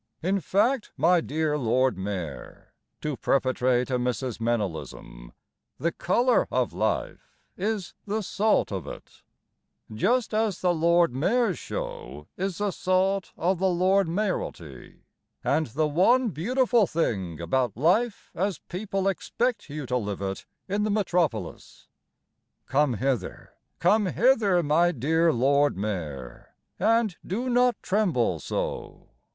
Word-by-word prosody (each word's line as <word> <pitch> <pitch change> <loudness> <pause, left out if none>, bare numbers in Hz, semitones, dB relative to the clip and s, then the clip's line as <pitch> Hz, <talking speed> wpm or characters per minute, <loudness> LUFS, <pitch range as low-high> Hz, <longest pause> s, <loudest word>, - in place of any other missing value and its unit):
In 195 +3 +1
fact, 215 - +1
my 170 +4 +4
dear 155 -1 -1
Lord 130 +1 +2
Mayor, 95 -7 -6 0.3
To 150 -2 -2
perpetrate 130 0 +1
a 125 - +1
Mrs. 125 -1 -2
Meynellism, 80 - -4 0.5
The 170 - 0
colour 240 +10 +2
of - - 0
life - - -3 0.2
is 205 -1 -3
the 215 +2 -1
salt 215 - +1
of 95 -7 -4
it, - - -11 0.7
Just 230 - +1
as 215 -2 0
the 180 -1 +2
Lord 170 -2 +3
Mayor's 195 - +1
Show 75 +1 -6
is 190 -1 -3
the 205 -1 0
salt 185 +1 0
of 180 +1 0
the 190 - +2
Lord 185 +1 +2
Mayoralty 165 - -4 0.4
And 155 -1 +1
the 150 +7 0
one 225 - +3
beautiful 235 - +2
thing 95 - -2
About 115 +6 -1
life 200 - +1
as 190 -1 -1
people 195 +3 -3
expect 225 +2 -1
you 145 0 -5
to 125 0 0
live 100 -4 -4
it 95 0 -4 0.2
In 200 +2 -1
the 215 - 0
Metropolis. 180 -6 -2 0.8
Come 140 -2 +1
hither, 130 +1 -3 0.2
come 200 +4 +3
hither, 210 -6 +3
my 165 +4 +3
dear 160 +4 +2
Lord 140 +1 +2
Mayor, 80 - -5 0.2
And 220 -1 +2
do 245 +7 -2
not 245 0 +3
tremble 185 - +1
so! - - -5
170 Hz, 130 wpm, -26 LUFS, 125-200 Hz, 0.8 s, my